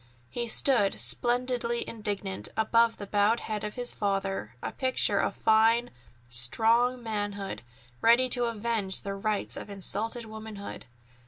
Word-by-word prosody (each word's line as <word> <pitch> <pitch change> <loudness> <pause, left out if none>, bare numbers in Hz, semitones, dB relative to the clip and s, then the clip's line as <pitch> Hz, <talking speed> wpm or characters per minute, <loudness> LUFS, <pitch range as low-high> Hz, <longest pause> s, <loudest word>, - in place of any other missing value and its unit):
He 240 0 -3
stood 230 -4 +3
splendidly 240 -1 +1
indignant, 205 -3 -3
above 230 +1 +2
the 205 - -7
bowed 205 +3 +1
head 215 -1 -4
of 210 0 -5
his 245 -1 -3
father, 195 - -2
a - - -3
picture 260 -1 +1
of - - -1
fine, 225 +2 +3 0.4
strong 230 - +3
manhood, 205 - -4 0.4
ready 240 +3 +5
to 245 -1 +1
avenge 225 -4 -1
the 200 - -5
rights 205 +1 -1
of - - -7
insulted 215 +4 -1
womanhood. 215 -2 -8
220 Hz, 135 wpm, -28 LUFS, 200-235 Hz, 0.4 s, ready